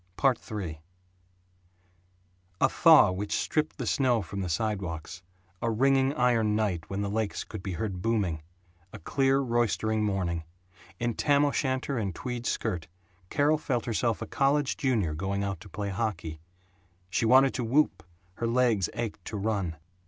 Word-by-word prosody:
III 85 -8 -5 1.8
A - - +5
thaw 155 - +6
which 100 +3 -2
stripped 155 0 -1
the - - -3
snow 125 -6 +2
from 100 +3 -5
the 90 - -3
sidewalks; 95 -2 -3 0.4
a 115 - 0
ringing 135 +4 +3
iron 115 -4 +2
night 95 -7 -1
when 100 +1 -2
the 100 - -1
lakes 110 -1 -1
could 110 - -8
be 95 -1 -4
heard 90 +1 -3
booming; 100 -8 0 0.5
a - - -8
clear 135 - +1
roistering 115 -3 +1
morning. 90 -5 -1 0.6
In 120 0 0
tam 145 +4 +3
o'shanter 130 -2 -1
and 95 -5 -3
tweed 125 -1 -4
skirt 90 -8 -2 0.4
Carol 150 +2 +2
felt 130 -6 -1
herself 115 -1 0
a - - -4
college 140 0 +1
junior 110 - 0
going 95 +5 -2
out 100 -3 -3
to 100 +2 -13
play 100 +3 -4
hockey. 90 -7 -3 0.7
She 105 - +1
wanted 130 +2 +6
to 125 - -2
whoop, 130 - +2 0.4
her 115 - -1
legs 115 -6 +2
ached 115 -2 -4
to 105 - -4
run. 100 -5 -1
110 Hz, 150 wpm, -28 LUFS, 95-125 Hz, 1.8 s, thaw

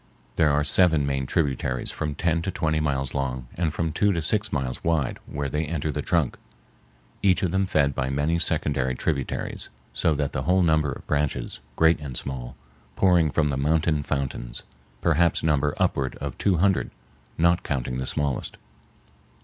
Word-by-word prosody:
There 80 -2 +4
are 75 +1 +2
seven 80 0 +4
main 70 -2 -1
tributaries 65 -6 0
from 75 -1 -3
ten 85 +2 +1
to 95 - -3
twenty 80 -3 0
miles 70 -4 -1
long 65 -3 -2
and 85 -2 0
from 80 0 -1
two 105 +6 +2
to 85 - -1
six 105 +5 0
miles 65 -4 -2
wide 80 -5 0
where 70 0 -3
they 75 +3 -1
enter 80 0 -2
the 75 - -3
trunk, 80 -4 0 0.8
each 95 -3 +3
of 90 - +1
them 95 +1 +1
fed 70 -6 +2
by 65 0 -1
many 75 +5 +1
secondary 70 -5 0
tributaries; 70 -1 -2 0.2
so 80 -2 +2
that 70 -1 -1
the 65 - -2
whole 90 +5 +3
number 80 -3 +2
of 65 - -8
branches, 70 -5 -1 0.2
great 80 +3 +4
and 70 -5 -5
small, 60 -2 -5 0.4
pouring 90 -4 +4
from 75 0 +1
the 70 - -1
mountain 75 +2 +2
fountains 65 -4 -3 0.4
perhaps 85 -1 +2
number 75 -2 +2
upward 65 -2 0
of 70 -2 -5
two 95 -4 +2
hundred, 95 +2 +2 0.5
not 85 +2 +3
counting 65 -5 -2
the 65 - -3
smallest. 70 -4 -2
75 Hz, 175 wpm, -25 LUFS, 70-85 Hz, 0.8 s, There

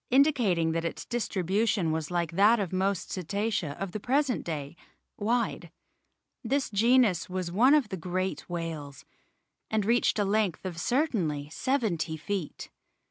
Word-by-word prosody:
indicating 245 - +3
that 165 0 -1
its 165 - -4
distribution 200 -4 0
was 160 -1 -2
like 175 -2 -1
that 205 +6 +5
of 190 -3 -3
most 190 -1 -1
Cetacea 195 -3 -2
of 195 -2 -3
the 215 - -4
present 265 +3 +1
day, 150 -2 -5 0.4
wide. 230 +3 -1 0.7
This 265 +2 0
genus 220 -4 +3
was 180 -2 -3
one 250 +10 +5
of 275 -8 +2
the 190 - -4
great 185 +3 -3
whales, 160 -5 -5 0.6
and 215 -2 0
reached 235 +1 +2
a 205 - +2
length 200 -3 0
of 175 -3 -4
certainly 175 - 0
seventy 205 - -1
feet. 185 0 -5
195 Hz, 140 wpm, -28 LUFS, 170-230 Hz, 0.7 s, that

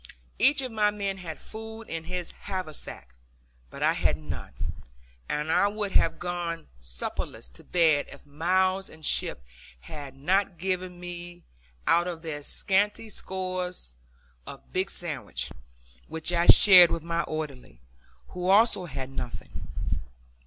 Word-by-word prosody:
Each 275 +3 +4
of 255 - -4
my 210 -2 +3
men 200 -2 -3
had 165 -4 -6
food 220 +1 -9
in 165 -6 -6
his 180 0 -4
haversack, 155 - -6 0.6
but - - -6
I - - +4
had - - +1
none, 80 0 -7 0.7
and 150 +2 -1
I 200 - +4
would 205 -1 -2
have 165 -2 +3
gone 175 -1 -4
supperless - - -5
to - - -10
bed 160 -5 +3
if - - -13
Mills 185 +6 +1
and 160 -1 -10
Shipp 65 - +1 0.4
had 140 - -9
not 185 +5 +1
given 185 0 -2
me 175 0 -8 0.4
out 175 +1 +4
of 170 -2 -5
their 150 -3 -4
scanty 205 +8 +1
stores 185 - -4 0.5
a - - -7
big 185 +1 -3
sandwich, 140 - -2 0.6
which 160 +1 -2
I 170 0 +2
shared 180 -4 +11
with 165 - -2
my 170 0 0
orderly, 140 - -6 0.5
who 180 0 -3
also 200 -2 +5
had 135 -4 -6
nothing. 125 -3 -7
175 Hz, 140 wpm, -27 LUFS, 155-190 Hz, 0.7 s, shared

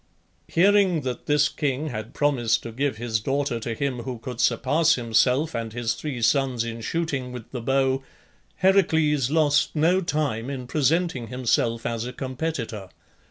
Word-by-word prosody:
Hearing 190 -2 +3
that 125 -3 -5
this 150 0 +4
king 145 +1 -2
had 110 -4 -6
promised 125 -6 +1
to 115 - -6
give 135 0 -1
his 110 -1 -1
daughter 135 +1 -1
to 115 0 -4
him 135 -1 -2
who 125 +1 -5
could 120 +1 -5
surpass 155 +7 +3
himself 125 +6 +2
and 115 -1 -3
his 120 -1 -1
three 130 -6 -5
sons 130 -2 +2
in 115 0 -5
shooting 140 -2 -2
with 120 -2 -9
the 125 - -5
bow, 135 +2 +1 0.5
Heracles 160 -8 +3
lost 150 -1 +2
no 170 +5 +3
time 145 -8 -1
in 130 -3 -5
presenting 150 -2 0
himself 115 -1 0
as 115 0 -2
a 125 - -6
competitor. 130 - -4
130 Hz, 160 wpm, -24 LUFS, 115-150 Hz, 0.5 s, this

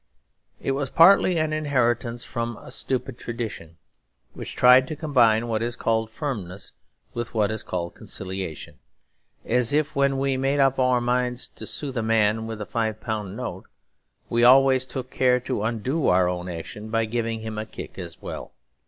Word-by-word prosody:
It - - -1
was 135 0 -2
partly 180 +2 +6
an 155 -1 +2
inheritance 120 -6 0
from 115 -2 -4
a - - -12
stupid 130 -1 -2
tradition, 110 -9 -6 0.6
which - - -7
tried 125 +1 +6
to 155 - -4
combine 120 -7 +3
what 110 -1 -1
it 120 +1 -2
called 110 -1 0
firmness 105 - -5 0.4
with 120 0 -5
what 105 -1 +2
it 110 - -4
called 85 -1 -3
conciliation; 95 -4 -6 0.7
as 120 0 +1
if 155 +1 0
when 140 -1 +2
we 135 0 0
made 135 +2 +1
up 135 -1 +3
our 125 -1 +3
minds 125 0 0
to - - -9
soothe 135 -4 -4
a - - +1
man 110 0 +2
with 110 -1 -6
a 105 - -4
five 110 -1 -2
pound 105 -3 -4
note, 125 - -5 0.6
we 120 0 +1
always 130 +1 +6
took 130 0 -6
care 125 -1 +3
to 125 -3 -3
undo 120 +7 -1
our 90 0 +4
own 90 0 -3
action 90 +5 -7
by 115 0 +1
giving 115 0 -2
him 110 -1 -5
a 110 - -5
kick - - -9
as - - -8
well. - - -7
120 Hz, 175 wpm, -24 LUFS, 110-130 Hz, 0.7 s, partly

